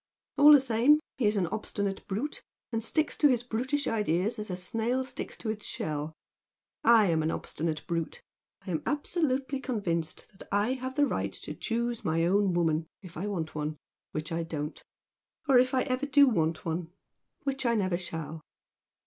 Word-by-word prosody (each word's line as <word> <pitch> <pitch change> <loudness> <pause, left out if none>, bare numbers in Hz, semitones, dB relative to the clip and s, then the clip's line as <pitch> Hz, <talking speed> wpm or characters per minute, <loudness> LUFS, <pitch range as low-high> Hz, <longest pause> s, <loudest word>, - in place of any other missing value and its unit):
All 295 +1 +10
the 290 - +10
same 260 +4 +4 0.2
he 230 - +3
is 210 0 +2
an 190 - +2
obstinate 200 +1 -3
brute, 230 +10 -3 0.3
and 225 -1 -1
sticks 310 +6 0
to 295 - +6
his 245 -4 +2
brutish 260 +5 -1
ideas 210 +1 0
as 210 - -4
a 180 - -2
snail 225 +8 -1
sticks 260 - -6
to 220 - -2
its 215 -1 -7
shell. 150 0 -3 0.7
I 230 -2 +7
am 160 -1 +2
an 155 - 0
obstinate 160 -1 -3
brute! 165 -2 -2 0.5
I 190 - -4
am 160 - -1
absolutely 280 -3 0
convinced 175 - -3
that - - -12
I 205 +5 +2
have 260 0 -5
the 290 0 +4
right - - -1
to - - -5
choose 235 0 -2
my 165 +1 +1
own 195 0 +3
woman, 165 -2 +1 0.2
if 180 -3 -11
I 185 +6 -3
want 165 -6 -3
one 150 0 -3 0.3
which 155 +1 -4
I 165 0 0
don't, 155 -2 -4 0.7
or 265 -3 +7
if 255 +1 +3
ever 260 0 0
I - - -18
do 285 0 +7
want 165 -8 +1
one 165 0 -3 0.5
which 275 -1 -1
I 235 - +3
never 185 -5 +1
shall!" 165 -3 -6
210 Hz, 185 wpm, -29 LUFS, 165-255 Hz, 0.7 s, All